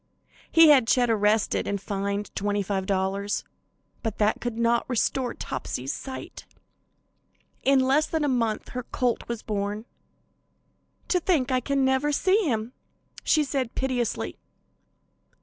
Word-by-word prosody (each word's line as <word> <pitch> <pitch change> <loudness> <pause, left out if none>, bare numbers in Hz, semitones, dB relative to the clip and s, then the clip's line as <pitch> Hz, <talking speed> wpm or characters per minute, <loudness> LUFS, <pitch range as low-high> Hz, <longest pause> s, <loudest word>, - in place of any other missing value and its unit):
He 330 -1 +8
had 265 -6 +6
Chet 245 0 +3
arrested 210 0 +2
and 200 0 -1
fined 200 +1 -3
$25, 200 0 -1 0.6
but 225 -3 -3
that 210 0 +1
could 240 -2 -3
not 235 0 +2
restore 250 +1 0
Topsy's 130 +1 -4
sight. 265 -1 -8 1.1
In 275 0 +4
less 275 +4 +3
than 320 -2 -1
a - - +2
month 230 -5 0
her 250 - -4
colt 245 -1 -2
was 235 -1 -4
born. 205 +1 -3 1.2
"To 360 - +3
think 315 -7 +1
I 255 - +3
can 275 +1 0
never 265 +3 +2
see 375 +6 +2
him," 225 +1 -2 0.5
she 310 - +3
said 270 -4 -2
piteously. 255 -3 -2
235 Hz, 130 wpm, -26 LUFS, 205-265 Hz, 1.2 s, He